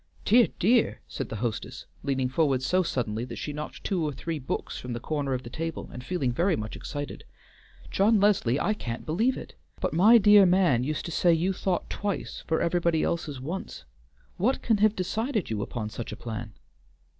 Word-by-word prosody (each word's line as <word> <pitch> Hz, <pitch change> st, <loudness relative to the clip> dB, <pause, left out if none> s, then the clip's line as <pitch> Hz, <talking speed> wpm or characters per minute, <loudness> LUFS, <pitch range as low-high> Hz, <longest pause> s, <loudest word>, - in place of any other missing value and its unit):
"Dear, 235 Hz, +3 st, +6 dB
dear!" 230 Hz, +5 st, +3 dB
said -, -, -5 dB
the -, -, -5 dB
hostess, 115 Hz, 0 st, -4 dB, 0.2 s
leaning 135 Hz, -2 st, 0 dB
forward 130 Hz, -1 st, +1 dB
so 185 Hz, +7 st, +3 dB
suddenly 115 Hz, -9 st, -2 dB
that -, -, -7 dB
she 150 Hz, -, -5 dB
knocked 150 Hz, +1 st, -7 dB
two 185 Hz, -4 st, 0 dB
or 150 Hz, -, 0 dB
three 160 Hz, +3 st, -4 dB
books 130 Hz, -, -4 dB
from 125 Hz, -1 st, -5 dB
the 120 Hz, -, -3 dB
corner 140 Hz, 0 st, -2 dB
of 125 Hz, -, -5 dB
the -, -, -8 dB
table, 165 Hz, 0 st, -5 dB
and 125 Hz, -, -7 dB
feeling 140 Hz, -5 st, -1 dB
very 175 Hz, +8 st, +2 dB
much 110 Hz, 0 st, -5 dB
excited. 145 Hz, -1 st, -6 dB, 0.7 s
"John 210 Hz, +2 st, +4 dB
Leslie, 195 Hz, -, +3 dB
I 210 Hz, -, +1 dB
can't 120 Hz, -, -5 dB
believe 220 Hz, +12 st, +1 dB
it! -, -, -9 dB, 0.3 s
but -, -, -1 dB
my 210 Hz, +8 st, +7 dB
dear 205 Hz, -2 st, +7 dB
man 175 Hz, -10 st, +3 dB
used 150 Hz, +3 st, -2 dB
to 170 Hz, -, -5 dB
say 175 Hz, +1 st, +3 dB
you 170 Hz, +4 st, +2 dB
thought 185 Hz, -1 st, -1 dB
twice 205 Hz, -1 st, -4 dB
for 160 Hz, -, +1 dB
everybody 170 Hz, -2 st, +1 dB
else's 155 Hz, -5 st, -2 dB
once. 165 Hz, +9 st, -6 dB, 0.5 s
What 245 Hz, +9 st, +1 dB
can 225 Hz, -2 st, +3 dB
have 215 Hz, +1 st, +3 dB
decided 215 Hz, -, -1 dB
you 105 Hz, -2 st, -1 dB
upon 110 Hz, +1 st, -4 dB
such 115 Hz, 0 st, -6 dB
a -, -, -5 dB
plan?" 110 Hz, -2 st, -6 dB
160 Hz, 195 wpm, -27 LUFS, 130-195 Hz, 0.7 s, my